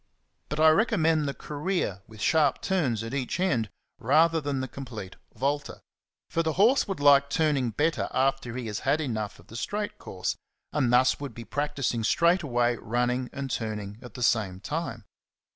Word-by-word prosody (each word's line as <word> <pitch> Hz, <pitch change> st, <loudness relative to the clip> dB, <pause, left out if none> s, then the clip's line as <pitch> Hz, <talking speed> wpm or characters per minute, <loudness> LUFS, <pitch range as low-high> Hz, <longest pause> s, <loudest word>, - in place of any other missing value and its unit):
But 150 Hz, -, -3 dB
I 160 Hz, 0 st, +7 dB
recommend 165 Hz, -6 st, +2 dB
the 140 Hz, -, -2 dB
Career 150 Hz, -, -2 dB
with 110 Hz, -1 st, -12 dB
sharp 150 Hz, +1 st, +3 dB
turns 140 Hz, -, 0 dB
at 115 Hz, -, -6 dB
each 135 Hz, +4 st, -2 dB
end 125 Hz, -, +1 dB, 0.3 s
rather 160 Hz, +6 st, +3 dB
than 140 Hz, -2 st, -2 dB
the 130 Hz, -, -2 dB
complete 115 Hz, -7 st, -8 dB, 0.2 s
Volte; 140 Hz, +2 st, -1 dB, 0.5 s
for 165 Hz, -, 0 dB
the 160 Hz, -1 st, 0 dB
horse 225 Hz, -, +4 dB
would 195 Hz, -5 st, -3 dB
like 140 Hz, -1 st, +6 dB
turning 145 Hz, -6 st, +1 dB
better 155 Hz, +9 st, 0 dB
after 135 Hz, -2 st, 0 dB
he 125 Hz, -, -4 dB
has 105 Hz, -1 st, -3 dB
had 150 Hz, -, +1 dB
enough 110 Hz, -8 st, -3 dB
of -, -, -18 dB
the 115 Hz, -, -13 dB
straight 205 Hz, -, -3 dB
course, -, -, -3 dB, 0.4 s
and 130 Hz, -5 st, +2 dB
thus 125 Hz, +1 st, +4 dB
would 140 Hz, -1 st, -6 dB
be 115 Hz, -, -8 dB
practising 140 Hz, -5 st, -1 dB
straight 170 Hz, -, +3 dB
away 120 Hz, -5 st, +1 dB
running 125 Hz, +2 st, -1 dB
and 135 Hz, -1 st, -5 dB
turning 105 Hz, -2 st, -4 dB
at 125 Hz, -4 st, -12 dB
the 125 Hz, -, -3 dB
same 105 Hz, -6 st, +1 dB
time. 120 Hz, -, -4 dB
135 Hz, 175 wpm, -27 LUFS, 115-155 Hz, 0.5 s, I